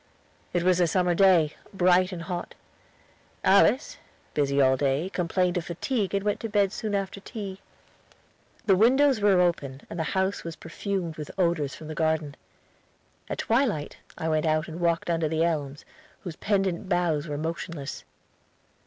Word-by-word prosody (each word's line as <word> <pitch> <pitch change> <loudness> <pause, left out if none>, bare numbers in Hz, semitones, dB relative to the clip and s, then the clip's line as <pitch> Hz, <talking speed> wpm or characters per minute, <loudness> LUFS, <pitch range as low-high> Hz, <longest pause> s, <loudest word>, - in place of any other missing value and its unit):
It 175 -1 0
was 180 0 +3
a 175 - +4
summer 180 +1 +2
day, 175 -5 +4 0.2
bright 185 0 +4
and 170 -2 -6
hot. 175 0 -5 0.9
Alice, - - +4 0.4
busy 140 -1 +1
all 130 -1 +5
day, 140 +7 0
complained 180 0 0
of 170 - -3
fatigue 200 - -2
and 195 - 0
went 205 - 0
to 225 - -4
bed 205 -1 +2
soon 215 -3 -2
after 195 0 -3
tea. 200 -2 -7 1.0
The 195 - +5
windows 255 +4 +4
were 200 -3 +4
open 145 -6 0
and 170 - -5
the 160 +4 -2
house 190 +1 0
was 165 -1 -6
perfumed 185 -5 -4
with 150 -1 -6
odors 170 -6 0
from 155 - -10
the 155 - -5
garden. 155 -2 0 1.0
At - - -3
twilight 225 - 0 0.2
I 160 - -3
went 155 0 +1
out 155 +1 +1
and 165 +1 -7
walked 170 -1 +1
under 165 -1 +1
the 160 +1 +1
elms, 145 -4 -2 0.4
whose 175 -4 -7
pendant 190 -2 -1
boughs 170 -4 +1
were 145 -1 -3
motionless. 160 -2 -5
175 Hz, 160 wpm, -26 LUFS, 155-195 Hz, 1.0 s, all